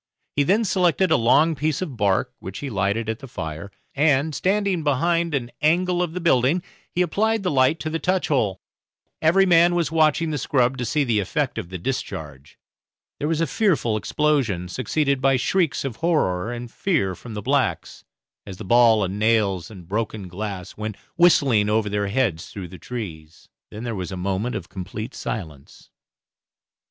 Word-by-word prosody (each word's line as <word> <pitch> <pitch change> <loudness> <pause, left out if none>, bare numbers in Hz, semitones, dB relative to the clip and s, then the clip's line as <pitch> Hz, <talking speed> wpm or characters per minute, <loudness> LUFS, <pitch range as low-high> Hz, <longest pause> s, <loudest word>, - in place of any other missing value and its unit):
He 145 - +3
then 200 +10 +2
selected 185 -1 +2
a - - +6
long 150 +8 +4
piece 150 0 -1
of 160 -8 -4
bark, 100 -3 +1
which 95 +2 -7
he 140 -2 -5
lighted 100 +2 0
at 110 0 -3
the 135 - -10
fire, 85 -4 -6 0.2
and, 145 +1 +2
standing 195 -1 0
behind 165 +3 +1
an 120 -3 -3
angle 175 +3 +2
of 175 -2 -2
the 180 - -3
building, 165 +1 +2 0.3
he 180 - +1
applied 215 +5 0
the 180 - 0
light 135 +4 +3
to 155 - -2
the 165 - -2
touch 185 +1 0
hole. 105 - +1 0.6
Every 175 +5 +4
man 175 -1 +5
was 170 -3 0
watching 160 0 +2
the 150 - -2
scrub 125 0 +1
to 125 - -2
see 150 +4 +1
the 115 -5 +1
effect 125 - -1
of 90 -6 -7
the 90 - -5
discharge. 75 - -5 0.6
There 145 - -1
was 165 0 0
a - - +3
fearful 165 - +1
explosion, 115 -6 0
succeeded 140 - 0
by 135 0 +4
shrieks 165 +2 0
of 125 -4 -4
horror 115 - 0
and 120 -1 -6
fear 120 - 0
from 110 +4 -10
the 105 - -4
blacks, - - -1 0.4
as 95 -3 -9
the 110 - -8
ball 115 0 +5
and 95 +2 -3
nails 105 -6 +1
and 90 -6 -12
broken 105 -1 -3
glass 95 0 -6
went 110 -1 -5 0.2
whistling 140 -12 +4
over 105 -1 +1
their 100 0 -1
heads 100 -7 -1
through 100 -6 -7
the 90 0 -11
trees. 85 -10 -8 0.2
Then 105 +2 -8
there 120 -1 -3
was 95 -2 -5
a 95 - -5
moment 100 +6 -2
of 85 - -5
complete 100 +5 -6
silence. 80 -10 -7
125 Hz, 185 wpm, -23 LUFS, 100-160 Hz, 0.6 s, a